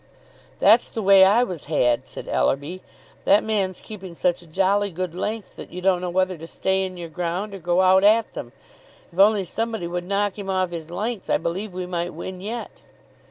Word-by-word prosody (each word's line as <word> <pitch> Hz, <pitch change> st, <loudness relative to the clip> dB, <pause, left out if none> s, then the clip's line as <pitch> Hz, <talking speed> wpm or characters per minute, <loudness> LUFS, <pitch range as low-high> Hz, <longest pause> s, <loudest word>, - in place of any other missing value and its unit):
"That's 220 Hz, +4 st, +5 dB
the 220 Hz, -, -4 dB
way 195 Hz, 0 st, +7 dB
I 205 Hz, +6 st, +5 dB
was 180 Hz, -10 st, -5 dB
had," 125 Hz, -6 st, +1 dB
said -, -, -9 dB
Ellerby. 140 Hz, -, 0 dB, 0.4 s
"That 200 Hz, +2 st, +5 dB
man's 200 Hz, -4 st, -1 dB
keeping 190 Hz, -5 st, -9 dB
such 175 Hz, 0 st, 0 dB
a 175 Hz, -, -16 dB
jolly 195 Hz, +4 st, +1 dB
good 180 Hz, -1 st, -4 dB
length 210 Hz, +3 st, -4 dB
that -, -, -9 dB
you 180 Hz, -, -6 dB
don't 180 Hz, -1 st, +2 dB
know 180 Hz, -, -2 dB
whether 185 Hz, -1 st, 0 dB
to 165 Hz, -, -8 dB
stay 190 Hz, +2 st, 0 dB
in 185 Hz, -1 st, -7 dB
your 170 Hz, -1 st, -6 dB
ground 180 Hz, +5 st, -3 dB
or 195 Hz, -, -7 dB
go 175 Hz, +2 st, +2 dB
out 190 Hz, +1 st, +5 dB
at 220 Hz, +2 st, +4 dB
them. -, -, -7 dB, 0.6 s
If 175 Hz, -, -8 dB
only 200 Hz, -1 st, +5 dB
somebody 225 Hz, 0 st, -3 dB
would 175 Hz, +1 st, -4 dB
knock 200 Hz, +1 st, 0 dB
him 195 Hz, -1 st, -6 dB
off 185 Hz, -2 st, 0 dB
his 165 Hz, -2 st, -6 dB
length, 205 Hz, +4 st, -4 dB
I -, -, +4 dB
believe 185 Hz, +6 st, -3 dB
we 180 Hz, 0 st, -4 dB
might 175 Hz, 0 st, -3 dB
win 185 Hz, -1 st, -7 dB
yet." 225 Hz, +4 st, -5 dB
185 Hz, 205 wpm, -23 LUFS, 175-200 Hz, 0.6 s, way